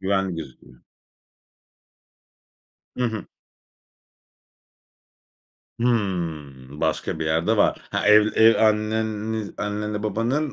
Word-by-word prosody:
Güvenli 95 -1 0
gözüküyor. 65 -5 -11 2.1
Hı 125 - -1
hı. 110 -3 -3 2.5
Hıı, 80 - -2
başka - - -1
bir 80 - -3
yerde 80 +8 +1
var. - - +2
Ha, - - -1
ev 105 0 +7
ev 115 0 +6
anneni 110 0 -1
annenle 105 0 -3
babanın, 120 +8 -1
105 Hz, 85 wpm, -23 LUFS, 85-110 Hz, 2.5 s, ev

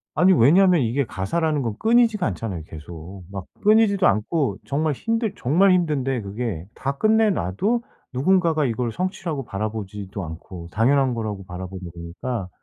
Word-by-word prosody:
아니 185 +1 +5
왜냐면 175 +4 +5
이게 125 +4 0
가사라는 150 - -1
건 115 -5 -2
끊이지가 225 -3 +3
않잖아요, 95 -3 -4
계속. 85 +4 -10
막 95 -2 -6 0.2
끊이지도 210 -2 +5
않고 110 - 0
정말 150 +2 0
힘들 225 - -1
정말 180 +10 +3
힘든데 135 -8 0
그게 100 -4 -4
다 140 +1 -3
끝내 220 +4 +4
놔도 200 - 0 0.3
누군가가 160 +2 +2
이걸 120 0 -1
성취라고 165 - -3
바라보지도 100 -2 -5
않고 85 +1 -8
당연한 130 - +3
거라고 105 -4 -4
바라보는 90 0 -7
거니까 90 +6 -5
125 Hz, 355 characters per minute, -23 LUFS, -, 0.3 s, 아니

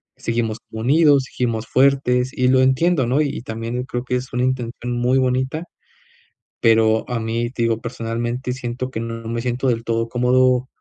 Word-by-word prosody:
seguimos 115 -2 -2
como 110 - -6
unidos, 145 +1 +4
seguimos 115 -3 -2
fuertes, 130 -2 +2
y 125 0 0
lo 130 0 +4
entiendo, 130 +1 +2
¿no? 130 +4 +1
Y 140 -5 -2
también, 115 +1 -4
creo 120 -1 -4
que 125 - -1
es 125 +1 -4
una 125 +1 -1
intención 125 -1 -3
muy 125 +2 +2
bonita, 130 +4 0 1.0
pero 110 0 +3
a 120 -1 -1
mí, 115 +1 -2
digo, 115 -1 0
personalmente, 120 +2 -3
siento 125 0 -4
que 110 - -4
no 115 0 -5
me 115 0 -2
siento, 125 +2 -1
del 115 -1 -1
todo 115 0 -1
cómodo, 125 +1 +2
125 Hz, 170 wpm, -21 LUFS, 115-130 Hz, 1.0 s, unidos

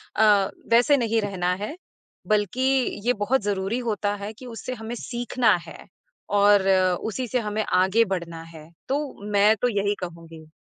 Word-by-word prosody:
अ, 210 -2 +4 0.2
वैसे 245 +5 +5
नहीं 230 -3 +1
रहना 185 -3 -1
है। 215 - -5 0.5
बल्कि 210 +3 0 0.4
ये 245 - +3
बहुत 245 +5 0
ज़रूरी 200 +3 -1
होता 205 -1 -1
है 205 +1 -6
कि 245 +4 -13
उससे 245 +1 -6
हमें 225 0 -6
सीखना 240 -1 +1
है - - -10 0.6
और 200 -1 +5 0.4
उसी 245 +4 -3
से 250 +2 0
हमें 215 -1 -2
आगे 190 +5 +3
बढ़ना 170 -4 -4
है। 155 0 -12 0.2
तो 275 +2 +1 0.3
मैं 205 +2 +5
तो 245 - +3
यही 205 +1 0
कहूँगी। 165 -3 -9
210 Hz, 160 wpm, -24 LUFS, 195-235 Hz, 0.6 s, वैसे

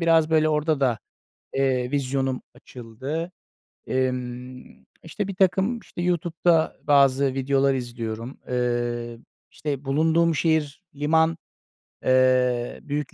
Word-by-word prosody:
biraz 165 -1 +3
böyle 155 -1 +4
orada 155 -1 +1
da, 125 -5 +2 0.6
eee, 130 -2 +1
vizyonum 135 -2 -1
açıldı. 130 +7 -6 0.6
Emm, 125 0 -4 0.2
işte 190 +5 -4
birtakım 190 +4 +1
işte 175 - -8
YouTube'da 170 -1 +1
bazı 140 -2 +4
videolar 135 +1 +2
izliyorum. 120 -1 -5
Eee, 120 -1 -1 0.3
işte 145 -2 -4
bulunduğum 160 +4 +2
şehir 160 +1 0
liman, 160 +3 +2 0.7
eee, 130 -1 +2
büyük 145 -1 -4
140 Hz, 100 wpm, -24 LUFS, 125-160 Hz, 0.7 s, böyle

